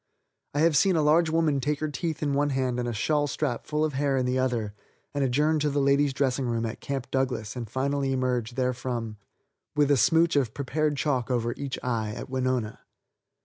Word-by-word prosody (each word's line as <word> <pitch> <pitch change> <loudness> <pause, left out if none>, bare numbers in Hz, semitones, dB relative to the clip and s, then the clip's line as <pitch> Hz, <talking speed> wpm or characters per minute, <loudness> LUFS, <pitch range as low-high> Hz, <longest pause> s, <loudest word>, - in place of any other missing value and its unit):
I 145 - +2
have 165 -1 +4
seen 190 +5 +4
a 155 - +2
large 160 +2 +4
woman 160 -3 +2
take 145 +2 -1
her 155 - -1
teeth 155 +1 -3
in 145 -1 0
one 145 +1 +2
hand 130 -2 -1
and 120 - -2
a - - -1
shawl 145 +6 +1
strap 140 -4 -2
full 150 0 +1
of 155 - -3
hair 140 0 +1
in 130 - +1
the 125 +1 0
other 120 -5 -1 0.4
and 145 -1 0
adjourn 150 +5 +2
to 150 0 +1
the 145 0 0
ladies' 140 +1 +3
dressing 135 -1 0
room 115 -1 -1
at 110 - -5
Camp 135 -2 -4
Douglas 125 -5 -1
and 120 -3 -5
finally 135 +2 -1
emerge 125 -3 -1
therefrom, 125 -3 -2 0.6
with 145 -1 +3
a 140 - +5
smooch 165 +7 +4
of 130 -6 +1
prepared 145 +2 -1
chalk 130 -2 0
over 120 -2 0
each 140 -2 -4
eye, 110 -4 -1
at - - -8
Winona. 130 -4 -1
135 Hz, 210 wpm, -27 LUFS, 125-145 Hz, 0.6 s, a